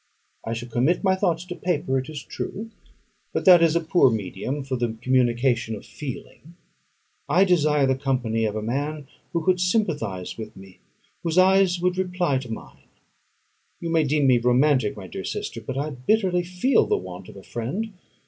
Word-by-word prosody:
I 115 - -3
shall 120 +1 -5
commit 125 - +1
my 190 -1 +3
thoughts 180 -3 0
to 180 -1 -6
paper, 145 -8 0
it 130 - -6
is 150 -3 -6
true; 225 +3 -6 0.6
but - - -2
that 180 -3 +8
is 165 -1 +4
a - - +4
poor 165 -4 +4
medium 110 +6 -3
for 135 -1 -3
the 120 -2 -2
communication 120 -2 +1
of 100 - -11
feeling. 150 +3 -9 0.7
I 185 - +5
desire 155 -6 +3
the 130 - +3
company 125 -4 0
of 105 -1 -2
a 110 - -3
man 145 +6 -3 0.3
who 170 -2 -2
could 185 -1 +3
sympathise 150 - -1
with 110 -1 -8
me; 95 -1 -14 0.4
whose 165 0 -2
eyes 185 -1 +5
would 180 +1 0
reply 180 -7 0
to 125 -3 -8
mine. 110 - -9 0.9
You 170 - -4
may 165 -1 +3
deem 145 0 +1
me 125 -2 +5
romantic, 125 -2 +2
my 100 - -8
dear 95 - -7
sister, 115 - -4
but 130 +4 -5
I 150 +2 -2
bitterly 180 - +1
feel 180 +9 +2
the - - +2
want 90 0 -8
of - - -12
a 95 - -11
friend. 185 - -4
140 Hz, 185 wpm, -24 LUFS, 120-175 Hz, 0.9 s, that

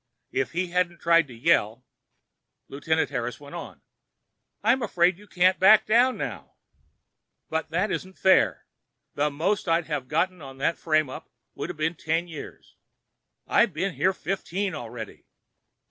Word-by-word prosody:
If 135 +3 -1
he 180 +1 -1
hadn't 180 -1 0
tried 170 -2 +3
to 125 - -12
yell— 115 +1 +1 0.8
Lieutenant 160 +2 -1
Harris 125 -2 -3
went 145 -1 -12
on: - - -9 0.8
"I'm 240 +5 +3
afraid 180 -4 +2
you 210 - -16
can't 185 0 +2
back 205 +3 +7
down 245 +4 +3
now." - - -6 1.0
"But 160 0 -1
it 185 +5 0
isn't 185 0 -5
fair! 190 -1 +3 0.5
The 145 +1 +1
most 175 +9 -1
I'd 165 0 +2
have 145 -5 -3
got 170 +6 +1
on 135 -7 -11
that 145 +5 0
frame 155 -2 +2
up 130 - -9 0.2
would've - - -6
been 155 +2 0
ten 165 +1 -1
years. 160 -4 -10 0.7
I've 220 -6 +3
been 185 +4 -2
here 155 +7 +2
fifteen 195 0 -3
already!" 115 -2 -8
165 Hz, 145 wpm, -26 LUFS, 145-185 Hz, 1.0 s, back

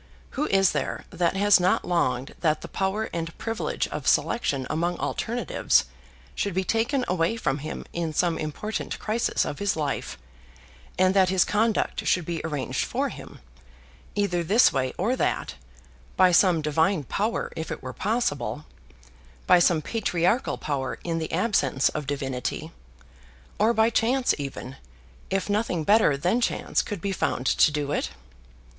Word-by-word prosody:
Who 295 +3 -1
is 195 -1 +4
there - - -3
that 175 -1 0
has 205 0 +5
not 180 +1 +2
longed 135 -7 0
that 155 -2 +1
the - - -7
power 195 +3 -1
and 165 -1 -4
privilege 225 -1 -2
of - - -5
selection 140 - +1
among 170 +2 -1
alternatives 235 -5 0 0.5
should 200 -3 -2
be 190 - +1
taken 235 +6 0
away 175 +3 +1
from 150 -9 -1
him 155 +3 -6
in 170 -2 -2
some 165 +1 +1
important 155 +8 -4
crisis 225 +2 0
of 145 - -5
his 205 -1 0
life, 150 -3 -3 0.8
and 185 0 +4
that 190 -2 +4
his 185 -1 +3
conduct 220 +1 0
should 180 -3 +2
be 170 -1 -3
arranged 150 -5 -2
for - - -1
him, - - -11 0.7
either 190 -4 0
this 210 +9 +5
way 130 -2 0
or 225 +8 +1
that, - - -1 0.6
by 185 -1 +6
some 175 -3 +4
divine 160 +3 +1
power 210 - -2
if 160 - -5
it - - -6
were 130 - -6
possible, 155 - -1 0.8
by 180 - +6
some 170 -2 +3
patriarchal 205 0 0
power 135 -3 -3
in 165 -1 -2
the 160 - -4
absence 165 - +2
of 150 -3 -5
divinity, 135 +2 -3 0.9
or 215 +3 +4
by 220 0 +3
chance 250 +3 +2
even, 135 -1 -6 0.5
if 195 0 -1
nothing 205 -5 0
better 205 -6 +4
than 180 - +1
chance - - 0
could 205 -6 -6
be 200 - -2
found 135 -8 -1
to - - +4
do 145 -1 -2
it? - - -1
175 Hz, 155 wpm, -25 LUFS, 150-210 Hz, 0.9 s, by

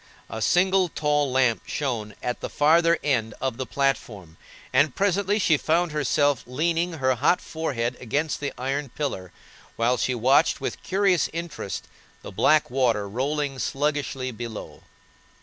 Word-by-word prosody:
A 110 - -5
single 185 +5 +3
tall 150 -3 0
lamp 125 -3 +2
shone 115 -8 -3
at 125 - -2
the - - -5
farther 165 +3 +4
end 115 -6 0
of 130 -3 -2
the 130 -1 -4
platform, 110 - -2 0.4
and 135 +1 +3
presently 200 +1 +1
she 165 -7 +3
found 165 +3 +1
herself 145 -2 +1
leaning 165 +6 0
her 130 -4 +1
hot 130 +9 +2
forehead 125 -7 -3
against 145 +6 -1
the 145 -1 -3
iron 135 +2 -2
pillar, 115 - -4 0.4
while 120 +2 +1
she 130 - 0
watched 130 +7 +3
with - - -4
curious 190 -2 +2
interest 165 - -5 0.4
the - - -8
black 155 -4 +3
water 120 -6 +1
rolling 135 +5 -2
sluggishly 140 -2 -1
below. 115 -2 -8
140 Hz, 145 wpm, -25 LUFS, 125-160 Hz, 0.4 s, farther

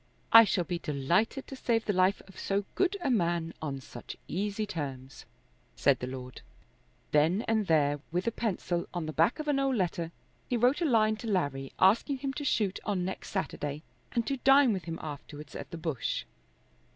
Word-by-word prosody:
"I 230 0 +11
shall 185 -3 +1
be 170 +1 -3
delighted 170 - 0
to 270 - -8
save 230 -3 0
the 205 - +1
life 185 +2 +2
of 195 - -13
so 200 0 -1
good 385 +1 +1
a 275 - +1
man 170 -6 +1
on 140 -3 -3
such 120 -2 -9
easy 205 +4 -2
terms," 135 -7 -6 0.5
said 140 -2 +3
the 125 - -4
lord. 130 -1 -7 0.7
Then 160 +8 +3
and 220 -3 0
there, 145 -2 +3
with 180 +4 -1
a 230 - +1
pencil, 185 -6 -2
on 175 -2 -2
the 155 - -4
back 165 +9 +3
of 305 - -5
an 285 -2 +2
old 270 -1 +1
letter, 170 -4 -1 0.4
he 245 - +1
wrote 250 +8 +3
a - - +2
line 220 -5 +3
to 230 - -7
Larry 140 -9 -1
asking 230 +9 +4
him 270 +1 -3
to 290 - -5
shoot 210 -8 +1
on 195 -4 -1
next 190 - -5
Saturday 150 -6 -3 0.3
and 235 -2 0
to 275 - -1
dine 270 -1 +5
with 185 -5 -4
him 165 -1 -4
afterwards 150 0 -8
at - - -6
the 170 - -6
Bush. 155 -7 -2
185 Hz, 195 wpm, -30 LUFS, 155-230 Hz, 0.7 s, I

